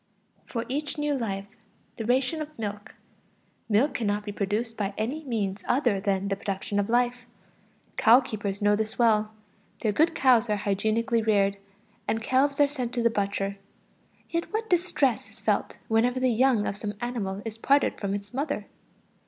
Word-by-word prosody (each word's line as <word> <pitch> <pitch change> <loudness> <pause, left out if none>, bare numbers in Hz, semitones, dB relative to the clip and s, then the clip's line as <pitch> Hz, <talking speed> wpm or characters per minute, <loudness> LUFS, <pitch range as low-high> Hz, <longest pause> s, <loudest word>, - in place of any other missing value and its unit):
For 230 -1 -3
each 290 +3 -3
new 295 0 0
life, 200 -7 -2 0.5
the 225 - -4
ration 260 +6 +1
of 305 0 -7
milk. 210 -2 -5 0.7
Milk 225 +8 +3
cannot 210 -2 -1
be 205 - -4
produced 210 +3 -2
by 200 -2 -3
any 260 +9 -2
means 210 -6 -2
other 245 -6 +2
than 195 -1 0
the 200 - 0
production 200 0 -2
of 200 - -1
life. 245 0 +1 0.7
Cow 230 +3 +7
keepers 205 -5 -4
know 205 0 +5
this 220 +1 -3
well; 215 -3 +3 0.5
their 215 - +2
good 320 +9 +2
cows 245 -3 +4
are 210 - +2
hygienically 220 +4 +1
reared, 200 -2 +2 0.5
and 225 - +1
calves 270 +5 +1
are 290 - +6
sent 255 -4 -4
to 240 - 0
the 235 - +4
butcher. 200 -1 -1 0.7
Yet 335 0 -3
what 440 0 -3
distress 300 -8 +1
is - - -16
felt - - 0
whenever 240 +3 +2
the 255 -1 +2
young 235 -2 +3
of 200 - -2
some 205 -1 -4
animal 210 -5 -3
is 225 0 -6
parted 280 +4 +2
from 200 -1 -1
its 205 +1 -7
mother! 280 +4 -2
225 Hz, 170 wpm, -27 LUFS, 205-255 Hz, 0.7 s, Cow